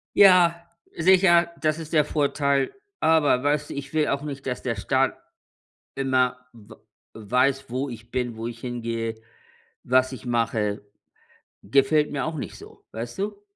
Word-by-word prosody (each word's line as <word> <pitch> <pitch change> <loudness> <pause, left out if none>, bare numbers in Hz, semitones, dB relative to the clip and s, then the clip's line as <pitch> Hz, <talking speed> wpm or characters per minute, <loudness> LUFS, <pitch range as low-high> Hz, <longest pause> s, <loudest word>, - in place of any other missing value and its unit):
Ja, 175 -3 +6 0.3
sicher, 175 0 +5
das 155 0 0
ist 160 0 -8
der 150 -2 +4
Vorteil. 140 -2 0 0.3
Aber 150 -5 +3
weißt 145 0 0
du, - - -5
ich 140 +1 -7
will 155 -1 +2
auch 140 +1 -1
nicht, 140 -2 -7
dass 125 -2 -3
der 120 -2 -1
Staat 130 +6 0 0.8
immer 130 -2 +1 0.2
w 110 -1 -15 0.4
weiß, 130 +5 0
wo 130 +3 -2
ich 115 -1 -10
bin, 120 -3 -3
wo 115 +1 -4
ich 115 -1 -8
hingehe, 115 -2 -4 0.6
was 130 +1 +2
ich 130 -3 -9
mache. 110 -4 -1 0.8
Gefällt 145 +7 +2
mir 140 - -2
auch 160 0 -4
nicht 145 - -6
so, - - -15
weißt 115 +5 -6
du? 205 0 -4
135 Hz, 155 wpm, -24 LUFS, 120-155 Hz, 0.8 s, Ja